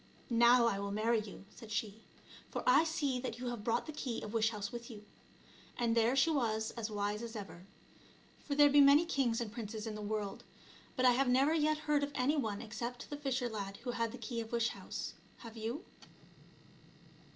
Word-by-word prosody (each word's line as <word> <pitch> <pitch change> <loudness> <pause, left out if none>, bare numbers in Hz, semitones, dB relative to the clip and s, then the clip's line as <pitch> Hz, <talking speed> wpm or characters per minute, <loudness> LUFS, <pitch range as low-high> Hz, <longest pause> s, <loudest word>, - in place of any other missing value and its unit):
" - - -28 0.2
Now 245 0 +6
I 200 -4 +1
will 200 0 -3
marry 220 +3 +1
you," 205 -2 -10
said 225 -3 -12
she, 220 -1 -3 0.3
" - - -19
for - - -4
I 265 +5 +6
see 290 -5 -1
that 245 -2 -4
you 245 0 -4
have 240 -3 -5
brought 230 +1 0
the 310 - -6
key 260 -6 -4
of 215 - -6
wish 225 -1 +3
house 205 -2 -5
with 235 0 -7
you 210 -3 -10 0.4
;" - - -24
and 235 -1 +1
there 230 +2 +3
she 275 +4 +4
was 220 -6 0
as 230 -2 -4
wise 205 0 -2
as 230 0 -7
ever. 195 -3 -8 0.8
For 285 - -2
there 290 0 +7
be 290 0 +6
many 285 +4 +7
kings 260 -8 +1
and 230 -3 -3
princes 220 -1 -5
in 220 - -4
the 210 - -6
world, 210 -1 -3 0.5
but 255 - +1
I 250 - +8
have 255 +1 +2
never 270 +5 +4
yet 310 -1 +2
heard 300 -1 +1
of 285 - -2
any 265 +4 +2
one 220 -6 -2
except 235 +4 -6
the - - -2
fisher 270 -3 -1
lad 200 -3 -5
who 245 - -2
had 230 -1 -1
the 250 - -8
key 235 0 -4
of 225 - -8
wish 235 -1 +1
house. - - -6 0.3
Have 230 -1 -9
you 230 +8 -4
235 Hz, 220 wpm, -34 LUFS, 220-265 Hz, 0.8 s, I